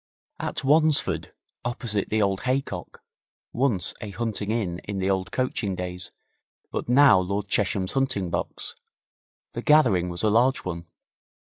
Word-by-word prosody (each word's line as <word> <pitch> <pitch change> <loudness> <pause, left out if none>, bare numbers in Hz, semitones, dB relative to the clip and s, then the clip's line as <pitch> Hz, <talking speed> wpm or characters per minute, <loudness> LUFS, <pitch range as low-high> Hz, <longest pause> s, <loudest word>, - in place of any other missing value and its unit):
At - - -3
Wansford, 155 +2 +2 0.3
opposite 120 -5 -2
the 110 0 +2
old 95 -1 0
Haycock, 130 -8 -3 0.5
once 120 -8 +2
a 105 - -5
hunting 105 0 -3
inn 100 -6 -1
in 100 -1 -4
the 95 +1 +1
old 95 -1 -1
coaching 115 -6 -1
days, 90 0 -5 0.6
but - - -4
now 135 -5 +7
Lord 100 +2 -2
Chesham's 95 -2 0
hunting 130 -10 0
box, - - -3 0.8
the 120 - -4
gathering 115 - +4
was 85 +3 -4
a 110 - +3
large 125 +4 +3
one. 85 -2 -5
105 Hz, 140 wpm, -25 LUFS, 95-125 Hz, 0.8 s, now